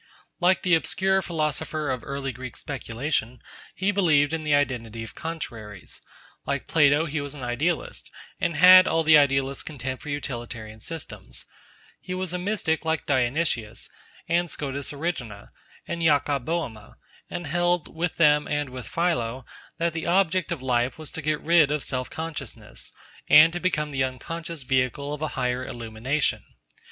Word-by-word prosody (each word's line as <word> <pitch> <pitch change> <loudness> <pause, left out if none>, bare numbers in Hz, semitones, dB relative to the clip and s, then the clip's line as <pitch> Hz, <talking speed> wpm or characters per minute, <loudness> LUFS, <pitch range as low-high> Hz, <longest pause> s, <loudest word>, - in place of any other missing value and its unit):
Like 180 +1 +3
the 180 - +2
obscure 190 +4 +2
philosopher 155 -3 -1
of 130 -2 -2
early 140 -1 -3
Greek 130 -1 -8
speculation, 125 -2 -3 0.4
he 195 +2 +1
believed 160 -7 +3
in 160 -1 -2
the 150 -1 +3
identity 115 -5 -1
of 115 - -9
contraries; 115 - -7 0.4
like - - -2
Plato, 150 0 +4
he 150 -1 -2
was 145 0 -5
an 135 - -8
idealist, 145 +8 -2 0.3
and 170 - 0
had 185 +2 +9
all 165 - +2
the 155 0 +7
idealist's 135 -2 +3
contempt 130 -4 -5
for 150 - -8
utilitarian 120 -6 -5
systems; 165 +7 -8 0.5
he 185 - -5
was 185 -1 -2
a 180 - -1
mystic 180 -4 -1
like 160 0 -1
Dionysius, 130 -4 0 0.4
and 170 +1 +1
Scotus 140 -2 -4
Erigena, 140 - -4 0.4
and 170 - -3
Jacob 145 -4 +2
Bohme, 130 -11 -3 0.3
and 175 - -5
held, 175 +2 0
with 170 +1 -1
them 150 -2 +4
and 145 -2 -1
with 125 -1 -7
Philo, 130 -8 -1 0.3
that 170 0 0
the 165 0 -4
object 185 0 +2
of 155 -6 -3
life 125 -1 +1
was 155 -2 -7
to 160 - -5
get 150 0 0
rid 165 -3 +5
of 150 -1 -1
self 130 -1 -2
consciousness, 160 -1 -6 0.4
and 165 +2 +8
to 175 - -2
become 150 -5 0
the 135 -1 +1
unconscious 165 +5 -5
vehicle 130 +3 0
of 150 - -6
a 155 - 0
higher 125 0 0
illumination. 120 +5 -1
150 Hz, 160 wpm, -25 LUFS, 130-165 Hz, 0.5 s, had